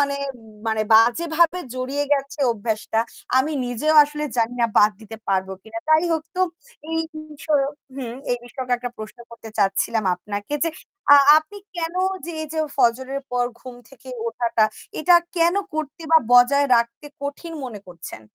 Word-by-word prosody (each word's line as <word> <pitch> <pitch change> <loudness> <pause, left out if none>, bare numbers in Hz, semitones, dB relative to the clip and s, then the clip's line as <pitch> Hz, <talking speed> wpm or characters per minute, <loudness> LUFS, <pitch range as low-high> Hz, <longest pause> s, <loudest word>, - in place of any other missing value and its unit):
মানে, 280 0 +1 0.5
মানে 220 -1 +1
বাজেভাবে 320 +9 +4 0.2
জড়িয়ে 270 +3 -2
গেছে 280 +1 -1
অভ্যাসটা। 220 0 -2 0.4
আমি 295 +4 +1
নিজেও 245 +6 0
আসলে 300 +1 -3
জানি 230 +1 +1
না 235 - +4
বাদ 210 +1 +6
দিতে 225 0 -10
পারবো 190 0 0
কিনা। 225 +1 -7
তাই 315 +2 +5
হোক 320 - 0
তো 370 - 0 0.5
এই 325 - 0 0.3
বিষয়ক 290 -2 0 0.2
হুম, 240 -3 -5 0.2
এই 245 - +2
বিষয়কে 250 +1 -5
একটা 245 0 -5
প্রশ্ন 215 +1 -9
করতে 230 -1 -11
চাচ্ছিলাম 200 +2 +1
আপনাকে 205 +8 -5
যে, 330 - +1 0.5
আ - - +10 0.2
আপনি 315 +6 -12 0.2
কেন 335 0 -3 0.3
যে, 340 - -5 0.2
যে 315 - -2 0.2
ফজরের 260 +2 +1
পর 245 0 +2 0.2
ঘুম 255 -1 -9
থেকে 260 -1 -16 0.2
ওঠাটা 230 -1 +1 0.4
এটা 350 +3 +5 0.2
কেন 340 +1 +3 0.2
করতে 310 +2 -4
বা 320 - +9
বজায় 265 +4 +6
রাখতে 235 +5 -2 0.2
কঠিন 330 +4 -6
মনে 220 -6 -7
করছেন? 170 -9 -10
255 Hz, 155 wpm, -22 LUFS, 225-300 Hz, 0.5 s, আ